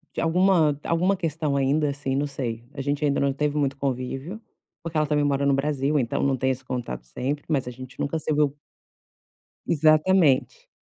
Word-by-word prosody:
De - - -1
alguma 165 -3 +3
alguma 180 +4 +2
questão 160 -5 -2
ainda, 140 +2 +2
assim, 140 -1 -3
não 140 +2 +1
sei. 120 -5 -4
A 140 - -5
gente 145 +2 -1
ainda 140 -1 +1
não 140 0 +2
teve 150 +2 -1
muito 140 -1 0
convívio, 135 - -4 0.4
porque 165 -3 -4
ela 155 - +3
também 150 0 +1
mora 140 -1 +1
no 140 - +3
Brasil, 140 +1 +1
então 120 -3 -1
não 140 -1 +2
tem 130 +1 0
esse 130 0 -3
contato 115 - -5
sempre, 135 - -3
mas 140 -6 0
a 125 - -4
gente 130 +1 -11
nunca 145 +3 -1
se 155 0 -2
viu 145 -1 +1 1.1
exatamente. 160 - +3
145 Hz, 190 wpm, -25 LUFS, 135-155 Hz, 1.1 s, alguma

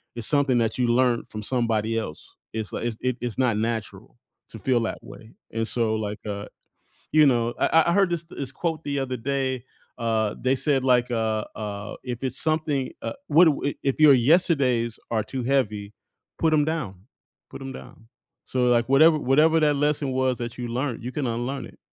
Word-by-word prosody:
is 120 -2 -5
something 140 -4 +2
that 115 -2 0
you 125 -1 +2
learned 120 0 +2
from 110 - -6
somebody 115 -2 0
else. 95 -9 -6 0.2
It's 110 -1 -5
li - - -3
it's 115 -2 -4
it 130 -1 -1
it's 120 -3 -4
not 125 -4 +2
natural 110 - -4 0.3
to - - -10
feel 125 -3 +1
that 115 - -2
way. 110 - -13 0.2
And 115 0 -2
so, 115 -2 0
like, 105 -1 -3
uh, 100 0 -4 0.7
you 155 -1 +6
know 120 -3 +2
I 160 0 +4
I - - +3
heard 195 -1 +3
this 170 -1 -2
this 140 -5 -7
quote 160 +2 -3
the 140 -1 -2
other 130 -1 -2
day, 130 0 -2 0.3
uh, 110 -3 0
they 130 +1 +2
said 135 -1 0
like, 125 -1 +3
uh, 110 -2 0
uh, 105 -1 -5
"If 125 -1 -5
it's 130 0 -3
something, 155 -4 0
uh - - -3
what 165 +4 +6
do 150 -3 +2
i 140 - -1
if 135 +2 -1
your 150 -2 +8
yesterdays 130 -5 +2
are 110 -2 0
too 130 -2 -4
heavy, 110 -6 0 0.5
put 160 -1 +2
'em 150 -1 +4
down, 155 - -2 0.6
put - - -9
'em 135 0 -6
down." 115 -3 -12 0.4
So, 125 -1 0
like, 120 0 +2
whatever 155 +4 +6
whatever 150 +4 +4
that 150 -1 +3
lesson 145 -1 0
was 130 -1 0
that 120 0 -5
you 120 - -4
learned, 125 0 -3
you 125 - -3
can 145 -1 -2
unlearn 120 +4 -3
it. - - -15
125 Hz, 200 wpm, -25 LUFS, 115-140 Hz, 0.7 s, your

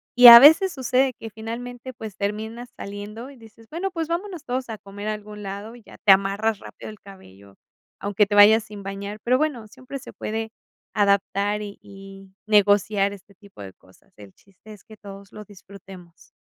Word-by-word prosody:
Y 245 0 +9
a 235 0 +13
veces 320 +8 +6
sucede 260 -1 0
que 225 - -8
finalmente, 235 +3 -8
pues, 220 -4 -9
terminas 220 +4 -5
saliendo, 205 +5 -8
y 280 - -14
dices: 225 -1 -18
"Bueno, 365 +5 -4
pues 330 -3 -4
vámonos 350 0 -5
todos 250 0 -4
a 220 - -6
comer 205 +1 -8
a - - -1
algún 210 0 -11
lado", 200 +4 -8
y 240 - -17
ya - - -16
te 200 - +6
amarras 200 +2 -1
rápido - - -11
el 215 -1 -13
cabello, 100 - -17 0.4
aunque 205 +1 +1
te 205 +1 -3
vayas 215 +2 +7
sin 205 -2 -11
bañar. 200 +2 -7
Pero 250 +2 +2
bueno, 275 -7 -3
siempre 260 +4 -10
se - - -13
puede 225 +1 -5 0.4
adaptar 200 0 0
y 205 -1 -8
y 195 -1 -14
negociar 205 -1 +2
este 200 0 -14
tipo 200 - -16
de 95 -1 -10
cosas. 95 - -26
El 100 -2 -15
chiste 200 +2 -19
es 210 - -15
que 220 -2 -14
todos 200 -1 -13
lo 210 - -10
disfrutemos. 190 -3 -16
210 Hz, 190 wpm, -23 LUFS, 200-235 Hz, 0.4 s, a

